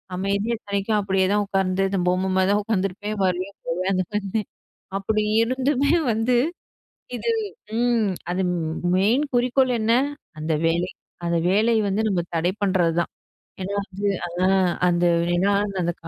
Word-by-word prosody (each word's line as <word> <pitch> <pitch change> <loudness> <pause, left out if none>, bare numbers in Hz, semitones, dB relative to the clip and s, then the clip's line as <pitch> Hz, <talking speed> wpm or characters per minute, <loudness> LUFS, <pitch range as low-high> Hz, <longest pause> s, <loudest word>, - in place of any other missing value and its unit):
அமைதியா 200 +5 0
இத்தனைக்கும் 200 +1 -1
அப்படியே 190 -1 +1
தான் 205 0 +2
உக்கார்ந்து 195 -1 0
இந்த 195 -1 -1
பொம்மை 185 +1 +1
மாதிரி 190 +1 +3
தான் 205 - +3
உக்காந்துருப்பேன், 205 0 -2
வருவேன், 185 +2 -2
போவேன். 180 +3 -1
அந்த 185 0 +1
மாதிரி 210 +1 -1 0.6
அப்படி 215 +2 0 0.2
இருந்துமே 265 +4 +1 0.2
வந்து 235 +3 +2 0.8
இது 465 - -1 0.5
ம் 235 -4 +2 0.2
அது 180 +2 -1
ம் 160 -2 -2 0.2
மெயின் 220 +9 +3
குறிக்கோள் 250 +1 +3
என்ன? 225 +1 +2 0.5
அந்த 155 +1 -2
வேலை! 170 +2 +1 0.4
அந்த 170 0 +1
வேலை 215 +5 +3 0.2
வந்து 205 +3 0
நம்ம 185 -4 +1
தடை 170 +2 +1
பண்றது 185 -4 +2
தான். - - -2 0.5
ஏன்னா 195 +2 -3
வந்து 200 +1 -4 0.2
அது 175 +1 -5
ஹான்! 185 -2 +3 0.2
அந்த 175 0 +2 0.3
ஏன்னா 195 +3 +2
அந்த 195 -2 -5
அந்த 170 0 0
195 Hz, 155 wpm, -23 LUFS, 185-215 Hz, 0.8 s, மாதிரி